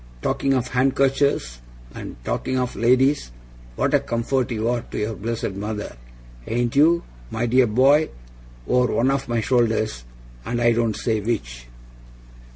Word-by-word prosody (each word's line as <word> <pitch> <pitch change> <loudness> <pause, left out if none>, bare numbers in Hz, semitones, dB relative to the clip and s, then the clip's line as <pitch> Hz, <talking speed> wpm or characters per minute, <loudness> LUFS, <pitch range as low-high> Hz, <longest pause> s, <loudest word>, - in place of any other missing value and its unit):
Talking 135 0 +1
of 125 -1 -1
handkerchers 135 - +1 0.3
and - - -8
talking 130 - -2
of 125 -1 -2
ladies 130 - +2 0.4
what - - 0
a - - +5
comfort 120 +2 -1
you 110 -1 -2
are 120 0 0
to - - -9
your 105 +2 -1
blessed 110 +2 -3
mother, 105 +2 -5 0.5
ain't 120 +1 -1
you, 165 +4 +4 0.3
my 115 - -2
dear 125 +1 +4
boy, 135 +8 +4 0.6
over 125 0 +2
one 130 +3 +3
of 135 -2 -2
my 120 -1 0
shoulders, 110 - +1 0.4
and 120 - -2
I 120 0 +4
don't 115 -2 +1
say 110 -2 -1
which! - - -4
120 Hz, 150 wpm, -22 LUFS, 110-130 Hz, 0.6 s, a